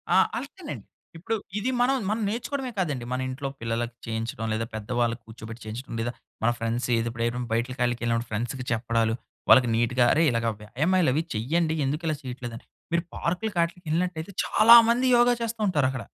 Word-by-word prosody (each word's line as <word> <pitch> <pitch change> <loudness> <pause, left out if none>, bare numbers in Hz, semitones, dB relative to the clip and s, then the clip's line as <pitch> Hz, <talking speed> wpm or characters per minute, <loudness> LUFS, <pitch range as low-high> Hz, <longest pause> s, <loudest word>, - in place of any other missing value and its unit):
ఆ! - - +7 0.2
అంతేనండి. - - -8 0.3
ఇప్పుడు 190 +7 -2 0.2
ఇది 250 +5 -1
మనం, 265 +2 +3
మనం 220 +1 0
నేర్చుకోవడమే 255 +3 -3
కాదండి. 145 -9 -1
మన 130 - -1
ఇంట్లో 135 +2 -4
పిల్లలకి 115 +1 -2
చేయించడం 115 0 -3
లేదా 110 +1 -1
పెద్దవాళ్ళకి 115 +2 -1
కూర్చోబెట్టి 110 0 -10
చేయించడం 115 +4 -7
లేదా 120 +1 -1 0.3
మన 115 - +4
ఫ్రెండ్స్ 115 +2 -1
ఎది 115 +1 0
ఎప్పుడైన 120 +1 -2
బయటకాళికెళ్ళినప్పుడు 120 -1 0
ఫ్రెండ్స్‌కి 120 +4 -3
చెప్పడాలు. 115 -1 +1 0.4
వాళ్ళకి 125 -2 +7
నీట్‌గా 120 +2 +2
అరేయ్! 160 +1 +4
ఇలాగా 115 0 0
వ్యాయామాలు 150 - +1
అవి 155 +4 +1
చెయ్యండి. 160 +8 +1
ఎందుకు 150 +5 -2
ఇలా 155 - +1
చేయట్లేదు 125 -2 -6
అని. - - -15 0.3
మీరు 170 - +2
పార్క్‌లకి 180 +3 -2
ఆట్లీకి 170 +1 -6
యెళ్ళినట్లయితే 175 +1 -1
చాలామంది 235 +3 +7
యోగ 240 0 +5
చేస్తూంటారక్కడ. 185 - 0
125 Hz, 155 wpm, -26 LUFS, 115-175 Hz, 0.4 s, ఆ